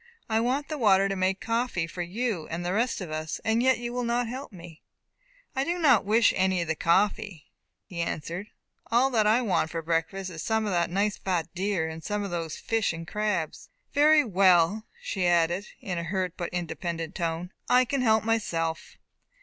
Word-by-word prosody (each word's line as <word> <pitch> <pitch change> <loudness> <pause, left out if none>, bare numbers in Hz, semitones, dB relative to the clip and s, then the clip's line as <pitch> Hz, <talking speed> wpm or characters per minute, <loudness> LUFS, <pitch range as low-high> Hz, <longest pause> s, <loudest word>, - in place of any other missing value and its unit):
I 220 0 +1
want 260 +5 0
the 305 -2 -4
water 195 -4 +4
to 195 - -2
make 190 0 0
coffee 230 -7 -1
for 175 +2 -6
you, 190 -1 -2
and 170 +1 -4
the 180 - -1
rest 230 +1 0
of 175 -4 -6
us, 155 0 -3
and 225 +1 +2
yet 260 0 +4
you 240 0 -5
will 250 0 -1
not 240 0 0
help 260 +3 -6
me." 170 -4 -12 0.7
"I 265 - +1
do 345 +4 -1
not 275 - +4
wish 225 +2 +4
any 185 -1 +2
of - - -8
the 160 - +1
coffee," 195 +1 0 0.3
he 170 -2 -5
answered. 170 +4 -4 0.4
"All 250 +4 +4
that 220 -3 +3
I 230 +4 +4
want 185 -7 +1
for 165 0 -4
breakfast 170 +4 -1
is 160 -2 -7
some 220 +3 0
of 205 - -1
that 175 -2 +1
nice 200 +3 0
fat 175 -4 -2
deer, 185 -3 -1
and 160 0 -7
some 210 -1 -2
of 200 - -5
these 165 -2 -3
fish 225 -6 0
and 165 0 -7
crabs." 210 -6 -2 0.2
"Very 300 +1 +6
well," 190 0 +3 0.2
she 185 -4 -1
added, 175 +3 +2
in 180 -3 -3
a - - -3
hurt 185 0 -2
but 175 - -4
independent 165 -1 -4
tone, 170 +1 -3 0.2
"I 255 +1 +5
can 270 +2 -1
help 220 -3 +3
myself." 165 -8 -1
190 Hz, 200 wpm, -27 LUFS, 170-225 Hz, 0.7 s, Very